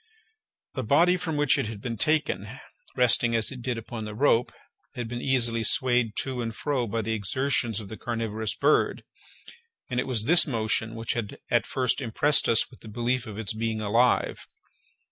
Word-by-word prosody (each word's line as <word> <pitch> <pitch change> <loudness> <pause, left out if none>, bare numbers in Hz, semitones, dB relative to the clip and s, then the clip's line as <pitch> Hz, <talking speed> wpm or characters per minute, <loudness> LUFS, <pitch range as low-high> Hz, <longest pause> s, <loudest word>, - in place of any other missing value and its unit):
The 130 - -3
body 165 +10 +4
from 170 -4 -3
which 145 -2 +3
it - - -1
had 110 -2 -7
been 115 +2 -4
taken, 155 +7 0 0.5
resting 120 -1 +4
as 110 +1 +1
it 130 -2 -8
did 125 -1 -3
upon 115 0 -6
the 105 0 -7
rope, 125 -1 +2 0.4
had 120 -2 -4
been 120 +1 -5
easily 120 -4 +2
swayed 120 -1 +1
to 130 -2 -4
and 115 -1 -4
fro 135 -4 -1
by 115 +1 -2
the 110 +2 -2
exertions 115 +1 0
of 105 - -8
the 110 - -8
carnivorous 110 -3 -3
bird, 145 +2 +2 0.9
and 125 - 0
it 125 - -2
was 120 -5 0
this 170 +5 +7
motion 110 -3 -1
which 115 0 -2
had 110 -4 -4
at 120 -2 +2
first 130 +1 0
impressed 135 +5 +2
us 115 - +3
with - - -16
the - - -13
belief 120 +3 -2
of 105 -2 -8
its 110 -3 -3
being 110 0 -2
alive. 115 +4 +1
120 Hz, 185 wpm, -26 LUFS, 110-130 Hz, 0.9 s, this